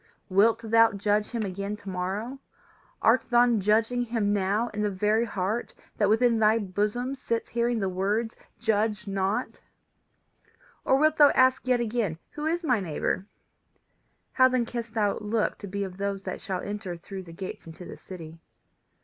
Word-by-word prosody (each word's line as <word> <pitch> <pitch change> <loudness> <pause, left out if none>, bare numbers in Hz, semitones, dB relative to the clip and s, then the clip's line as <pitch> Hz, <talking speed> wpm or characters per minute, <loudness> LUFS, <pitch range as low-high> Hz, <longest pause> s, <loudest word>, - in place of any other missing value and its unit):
Wilt 220 +4 +4
thou 225 0 +4
judge 205 +1 +1
him 230 -3 -2
again 200 +1 -4
to 205 -1 -16
morrow? 195 +8 -3 0.6
Art - - +5
thou 240 -1 +4
judging 220 +4 +2
him 225 -4 0
now 205 +4 0
in 210 - -4
the 210 - +1
very 210 +4 +1
heart 210 +2 -3 0.2
that 205 -2 +2
within 230 +1 +3
thy 215 +1 +4
bosom 210 +5 -1
sits 230 -4 -3
hearing 235 0 0
the 195 - 0
words 205 +5 -1 0.2
Judge 215 -2 0
not? 195 +1 -2 1.2
Or 265 - +3
wilt 310 +2 +3
thou 290 -1 +8
ask 260 0 +3
yet 250 -1 +3
again 220 -8 -1
Who 300 +1 -4
is 340 +2 -1
my 250 -8 +2
neighbour? 185 +2 -2 1.0
How 255 -1 +5
then 255 -2 +1
canst 235 -1 -6
thou 205 -2 +1
look 215 +1 -1
to 200 - -7
be 200 +1 -3
of 185 -2 -7
those 200 0 -3
that 185 - -5
shall 190 -2 -3
enter 200 -4 -5
through 190 +3 -8
the 175 -2 -12
gates 185 0 -7
into 165 +2 -10
the - - -9
city? 165 -3 -10
210 Hz, 170 wpm, -27 LUFS, 195-235 Hz, 1.2 s, thou